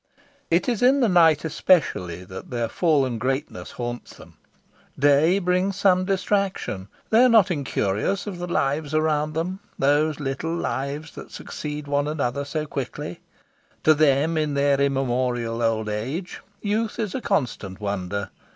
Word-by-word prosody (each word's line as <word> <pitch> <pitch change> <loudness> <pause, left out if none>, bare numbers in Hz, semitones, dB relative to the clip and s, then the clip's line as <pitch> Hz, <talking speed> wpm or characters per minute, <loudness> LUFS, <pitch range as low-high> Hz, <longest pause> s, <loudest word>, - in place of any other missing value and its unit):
It 170 +2 +2
is 240 -4 0
in 260 +3 +5
the 240 - +4
night 165 -5 +4
especially 115 - +1
that 95 0 -9
their 120 -2 -1
fallen 135 -6 +1
greatness 135 +5 -3
haunts 120 0 -6
them. - - -15 0.6
Day 145 +6 +4
brings 185 +1 +1
some 185 -2 +3
distraction. 195 - -1 0.2
They 225 +3 +6
are 255 - +6
not 215 -5 +5
incurious 140 - -1
of 195 -4 -6
the 175 - -4
lives 150 -2 -1
around 155 -1 +1
them 175 +4 -2 0.2
these 145 +2 +2
little 145 +4 -3
lives 145 -1 -3
that - - -10
succeed 150 -1 -6
one 145 0 0
another 140 -2 -2
so 150 +2 -3
quickly. 135 -4 -5 0.6
To 155 - +6
them, 155 +1 +3
in 150 -2 -1
their 140 0 +2
immemorial 125 -4 0
old 110 -1 0
age, 130 - -4 0.2
youth 215 +2 -1
is 210 -4 -2
a 260 - -3
constant 115 - -2
wonder. 100 -1 -3
150 Hz, 150 wpm, -24 LUFS, 125-180 Hz, 0.6 s, They